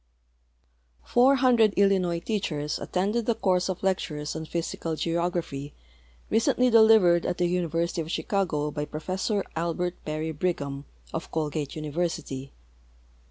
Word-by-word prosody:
Four 255 Hz, +3 st, +5 dB
hundred 240 Hz, -5 st, +4 dB
Illinois 190 Hz, -4 st, +3 dB
teachers 155 Hz, -8 st, -2 dB
attended 210 Hz, +5 st, -1 dB
the 235 Hz, -, +2 dB
course 185 Hz, -2 st, +1 dB
of 185 Hz, 0 st, -4 dB
lectures 155 Hz, -6 st, -1 dB
on 160 Hz, 0 st, -4 dB
Physical 165 Hz, 0 st, -3 dB
Geograjihy 165 Hz, -4 st, -2 dB, 0.6 s
recentl}' 245 Hz, +3 st, +3 dB
delivered 220 Hz, -7 st, +6 dB
at 175 Hz, -, -2 dB
the 175 Hz, -, +1 dB
University 170 Hz, -1 st, 0 dB
of 160 Hz, -, -6 dB
Chicago 165 Hz, -6 st, -1 dB
by 150 Hz, 0 st, -3 dB
Professor 190 Hz, +7 st, -2 dB
Albert 170 Hz, +2 st, -2 dB
Perry 155 Hz, +1 st, -3 dB
Brigham, 145 Hz, -4 st, -2 dB, 0.3 s
of 165 Hz, -, -4 dB
Colgate 150 Hz, -2 st, -3 dB
University. 155 Hz, -3 st, -3 dB
170 Hz, 120 wpm, -27 LUFS, 155-195 Hz, 0.6 s, delivered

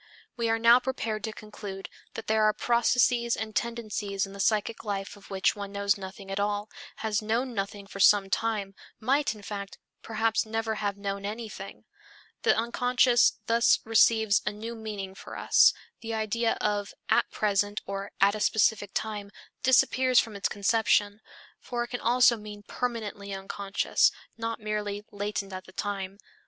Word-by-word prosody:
We 235 Hz, -1 st, -1 dB
are 225 Hz, -, +2 dB
now 230 Hz, +2 st, +7 dB
prepared 230 Hz, -4 st, -3 dB
to 220 Hz, -, -3 dB
conclude 205 Hz, -2 st, -8 dB, 0.3 s
that 225 Hz, -, -6 dB
there 220 Hz, 0 st, +2 dB
are 215 Hz, -, +4 dB
processes 235 Hz, 0 st, +2 dB
and 220 Hz, -1 st, -5 dB
tendencies 215 Hz, -4 st, -2 dB
in 195 Hz, -, -11 dB
the 200 Hz, -, -10 dB
psychic 215 Hz, +2 st, 0 dB
life 200 Hz, -2 st, -4 dB
of 205 Hz, -, -16 dB
which 195 Hz, -1 st, +1 dB
one 200 Hz, -1 st, -6 dB
knows 200 Hz, 0 st, +1 dB
nothing 195 Hz, 0 st, -9 dB
at 195 Hz, -, -2 dB
all, 205 Hz, +1 st, -1 dB, 0.3 s
has 215 Hz, -1 st, +1 dB
known 235 Hz, +4 st, -1 dB
nothing 200 Hz, -1 st, -4 dB
for 195 Hz, 0 st, -10 dB
some 200 Hz, 0 st, +6 dB
time, 205 Hz, -1 st, -1 dB, 0.3 s
might, 270 Hz, 0 st, +1 dB
in 210 Hz, -, -13 dB
fact, 200 Hz, -1 st, -6 dB, 0.2 s
perhaps 225 Hz, 0 st, 0 dB
never 225 Hz, 0 st, -2 dB
have 200 Hz, -1 st, -1 dB
known 200 Hz, 0 st, -4 dB
anything. 210 Hz, -2 st, -7 dB, 0.6 s
The -, -, +3 dB
unconscious 245 Hz, +2 st, +3 dB
thus 230 Hz, +1 st, +4 dB
receives 220 Hz, -1 st, +4 dB
a 210 Hz, -, -1 dB
new 220 Hz, +3 st, -6 dB
meaning 210 Hz, -4 st, -6 dB
for -, -, -9 dB
us; -, -, +6 dB, 0.3 s
the 225 Hz, -1 st, -4 dB
idea 225 Hz, +1 st, 0 dB
of 205 Hz, -1 st, -1 dB
"at -, -, +3 dB
present" 205 Hz, 0 st, 0 dB
or 195 Hz, 0 st, -5 dB
"at 200 Hz, +1 st, +5 dB
a 215 Hz, -, -4 dB
specific 210 Hz, -1 st, +2 dB
time" 210 Hz, -2 st, -3 dB, 0.3 s
disappears 255 Hz, 0 st, +4 dB
from 220 Hz, -2 st, -2 dB
its 200 Hz, -, -1 dB
conception, 205 Hz, 0 st, +2 dB, 0.4 s
for 240 Hz, -1 st, -3 dB
it 240 Hz, -, -8 dB
can 245 Hz, -, -4 dB
also 245 Hz, 0 st, +5 dB
mean 210 Hz, -1 st, -10 dB
permanently 210 Hz, -5 st, -4 dB
unconscious, 195 Hz, +1 st, +1 dB, 0.2 s
not 230 Hz, 0 st, -4 dB
merely 210 Hz, -1 st, -3 dB
latent 205 Hz, -1 st, -3 dB
at 185 Hz, 0 st, -6 dB
the -, -, -14 dB
time. 195 Hz, -1 st, -4 dB
210 Hz, 165 wpm, -28 LUFS, 200-230 Hz, 0.6 s, now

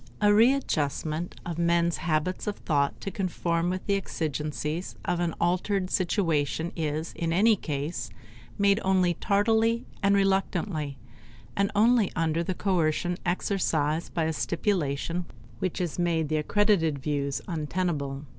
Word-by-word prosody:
A 205 Hz, 0 st, +5 dB
readjustment 175 Hz, -, +1 dB
of 170 Hz, -1 st, -4 dB
men's 170 Hz, 0 st, +2 dB
habits 165 Hz, +4 st, -1 dB
of 205 Hz, -, -1 dB
thought 140 Hz, -3 st, 0 dB
to 195 Hz, -, -4 dB
conform 175 Hz, -3 st, -1 dB
with 185 Hz, 0 st, -3 dB
the 200 Hz, -, +1 dB
exigencies 155 Hz, -2 st, -3 dB
of 175 Hz, -1 st, 0 dB
an 170 Hz, -2 st, -1 dB
altered 185 Hz, +2 st, 0 dB
situation 165 Hz, -4 st, 0 dB
is 155 Hz, 0 st, -2 dB
in 165 Hz, -1 st, -2 dB
any 215 Hz, +6 st, +5 dB
case 150 Hz, -2 st, -4 dB, 0.5 s
made 200 Hz, +1 st, +4 dB
only 185 Hz, -2 st, +3 dB
tardily 220 Hz, +5 st, +2 dB, 0.2 s
and 200 Hz, 0 st, +4 dB
reluctantly, 190 Hz, -6 st, 0 dB, 0.6 s
and 200 Hz, 0 st, +2 dB
only 225 Hz, -1 st, +4 dB
under 165 Hz, 0 st, +1 dB
the 185 Hz, +2 st, -2 dB
coercion 175 Hz, -2 st, +1 dB
exercised 165 Hz, -4 st, 0 dB
by 165 Hz, -, +1 dB
a 160 Hz, 0 st, 0 dB
stipulation 170 Hz, -1 st, -1 dB, 0.3 s
which 185 Hz, -3 st, -2 dB
has 175 Hz, -2 st, -2 dB
made 165 Hz, -3 st, +1 dB
the 155 Hz, -, +1 dB
accredited 170 Hz, -2 st, +2 dB
views 140 Hz, 0 st, -2 dB
untenable. 150 Hz, -4 st, -2 dB
170 Hz, 135 wpm, -27 LUFS, 155-195 Hz, 0.6 s, A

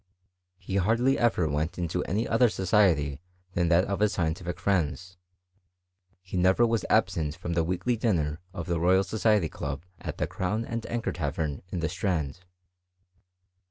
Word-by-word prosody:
He 95 Hz, 0 st, -3 dB
hardly 115 Hz, +8 st, +2 dB
ever 105 Hz, -8 st, +2 dB
went 75 Hz, +3 st, -2 dB
into 90 Hz, 0 st, -1 dB
any 110 Hz, +6 st, -1 dB
other 115 Hz, +1 st, +4 dB
society 90 Hz, -9 st, +2 dB, 0.3 s
than 85 Hz, -1 st, +1 dB
that 85 Hz, +2 st, +4 dB
of 100 Hz, -1 st, -2 dB
his 105 Hz, -1 st, +2 dB
scientific 85 Hz, +1 st, -2 dB
friends: 90 Hz, -1 st, -1 dB, 1.1 s
he 95 Hz, -, -8 dB
never 95 Hz, +6 st, +4 dB
was 115 Hz, -4 st, 0 dB
absent 75 Hz, -2 st, +1 dB
from 85 Hz, -1 st, -4 dB
the 85 Hz, -1 st, +2 dB
weekly 90 Hz, +9 st, 0 dB
dinner 80 Hz, -9 st, 0 dB
of 85 Hz, -2 st, -5 dB
the 85 Hz, -1 st, -1 dB
Royal 95 Hz, +3 st, +4 dB
Society 105 Hz, -2 st, +2 dB
club 70 Hz, +1 st, -5 dB
at -, -, -6 dB
the -, -, 0 dB
Crown 105 Hz, +5 st, -2 dB
and 115 Hz, -1 st, -4 dB
Anchor 120 Hz, 0 st, -2 dB
Tavern 75 Hz, -2 st, -3 dB
in 90 Hz, -, -3 dB
the 80 Hz, -, +1 dB
Strand. 85 Hz, -5 st, -2 dB
90 Hz, 160 wpm, -28 LUFS, 80-105 Hz, 1.1 s, other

